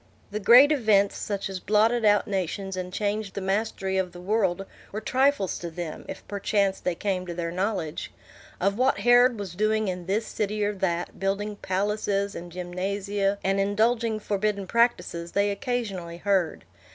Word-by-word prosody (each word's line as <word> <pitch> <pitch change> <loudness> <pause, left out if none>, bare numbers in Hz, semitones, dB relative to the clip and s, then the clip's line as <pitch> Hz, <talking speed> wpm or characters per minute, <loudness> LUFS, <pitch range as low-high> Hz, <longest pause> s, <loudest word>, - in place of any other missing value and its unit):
The 210 - -2
great 245 +8 +8
events, 215 -8 +3
such 200 -2 -3
as 190 -1 -5
blotted 220 +5 +2
out 205 -1 +4
nations 195 0 -2
and 180 -1 -4
changed 205 0 -2
the - - -2
mastery 195 -1 -1
of 180 -2 -2
the 175 - -10
world, 195 -1 0 0.3
were 210 - -3
trifles 260 -3 +1
to 170 - -5
them, 165 -1 -6
if - - -8
perchance 200 -1 0
they 180 - -1
came 185 -1 -2
to 175 - -5
their 170 -1 -3
knowledge. 185 -4 -2 0.5
Of 200 +4 0
what 255 -5 +2
Herod 245 0 +6
was 195 -4 -6
doing 215 +2 +1
in 180 -1 -5
this 210 +4 0
city 210 0 -2
or 205 - 0
that, 180 -3 -2
building 200 +2 -1
palaces 200 +1 -1
and 175 0 -8
gymnasia, 195 +3 -2
and 195 +1 +1
indulging 220 +3 +1
forbidden 205 -1 -1
practises, 185 -6 0
they 200 0 +2
occasionally 200 -7 -3
heard. 185 -3 0
200 Hz, 165 wpm, -26 LUFS, 185-215 Hz, 0.5 s, great